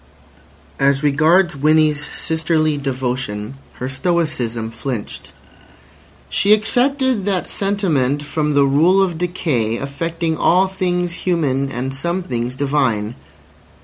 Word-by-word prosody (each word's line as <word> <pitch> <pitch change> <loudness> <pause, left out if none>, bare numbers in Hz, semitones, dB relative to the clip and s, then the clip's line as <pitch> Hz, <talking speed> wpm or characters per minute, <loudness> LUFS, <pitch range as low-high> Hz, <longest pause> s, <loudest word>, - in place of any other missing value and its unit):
As 140 +1 +2
regards 155 +4 +3
Winnie's 150 +1 +2
sisterly 160 -1 0
devotion, 125 -5 -3 0.2
her 125 - -5
stoicism 130 -7 -1
flinched. 115 -1 -6 1.0
She 205 +1 +3
excepted 250 +1 +1
that 195 -3 -1
sentiment 160 -9 0
from 150 0 -1
the 140 -1 +5
rule 160 +8 +4
of 175 -4 -2
decay 150 -11 -1
affecting 165 +4 -3
all 185 +2 +4
things 180 -2 -1
human 150 -7 -1
and 130 +1 -3
some 170 +7 -2
things 125 -4 -3
divine. 130 -6 0
150 Hz, 110 wpm, -19 LUFS, 135-175 Hz, 1.0 s, the